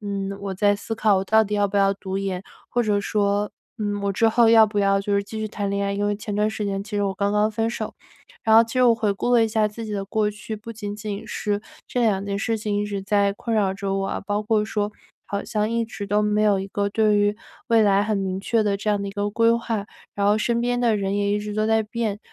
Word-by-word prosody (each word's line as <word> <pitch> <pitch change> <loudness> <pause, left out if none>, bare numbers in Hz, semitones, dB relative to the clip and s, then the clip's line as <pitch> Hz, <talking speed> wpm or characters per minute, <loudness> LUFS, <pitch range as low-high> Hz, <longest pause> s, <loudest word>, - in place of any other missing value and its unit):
嗯， 200 -1 -3
我 200 -1 -4
在 205 +2 +3
思 225 +2 -5
考 215 -3 +3
我 190 - -2
到 220 +2 +4
底 210 - -3
要 205 -1 +2
不 200 - -3
要 195 0 +4
读 190 -1 -5
研， 195 -1 -2 0.3
或 240 - +1
者 210 -2 +1
说， 205 0 0 0.3
嗯， 205 -1 -2
我 200 - 0
之 225 +4 +2
后 230 +1 +4
要 225 -1 +7
不 210 -1 -3
要 195 0 +3
就 200 0 -1
是 200 - +2
继 220 +2 -7
续 215 - -2
谈 205 -1 -3
恋 200 0 -1
爱， 200 - -1
因 205 +1 -1
为 205 0 0
前 210 0 -5
段 210 +1 +2
时 215 -1 -4
间 195 -1 -2
其 210 +1 -6
实 205 - +1
我 195 -1 0
刚 200 +2 0
刚 210 +1 +2
分 225 +1 -1
手。 235 - -4 0.5
然 220 0 +5
后 230 - +8
其 225 - -10
实 255 - +3
我 235 -2 +6
回 220 -3 0
顾 200 +5 -2
了 230 -2 +5
一 - - -1
下 215 -1 +1
自 225 +2 -8
己 215 - -5
的 200 -1 -2
过 210 +1 0
去 215 +1 -7
不 225 +2 -9
仅 205 -2 -6
仅 210 -1 -5
是 205 -1 -2 0.3
这 245 - -2
两 200 -4 +1
件 200 0 -2
事 225 +2 0
情 210 -1 -2
一 - - -1
直 200 -1 -3
在 200 0 +2
困 225 +2 -3
扰 200 -3 +2
着 195 -1 -3
我 195 0 -1
啊， - - -3
包 205 0 0
括 215 0 +1
说 210 -1 -2 0.4
好 200 0 -3
像 215 0 -1
一 230 0 0
直 210 -2 -7
都 210 +1 +2
没 210 0 +1
有 205 -2 +3
一 190 - -4
个 200 +1 -1
对 215 0 +2
于 205 0 +2 0.3
未 230 -1 +5
来 200 -1 +4
很 215 0 0
明 190 -1 -2
确 225 +3 +1
的 205 -2 +1
这 205 +2 -4
样 205 -1 +1
的 - - -3
一 - - -5
个 205 0 -1
规 230 +2 +3
划， 230 -3 -2 0.3
然 200 0 0
后 210 +1 +4
身 235 +1 0
边 245 0 0
的 230 -3 +3
人 195 -1 -1
也 205 0 +1
一 205 - +1
直 210 0 -5
都 215 0 +1
在 220 0 +3
变， 215 -2 -3
210 Hz, 305 characters per minute, -23 LUFS, 200-220 Hz, 0.5 s, 后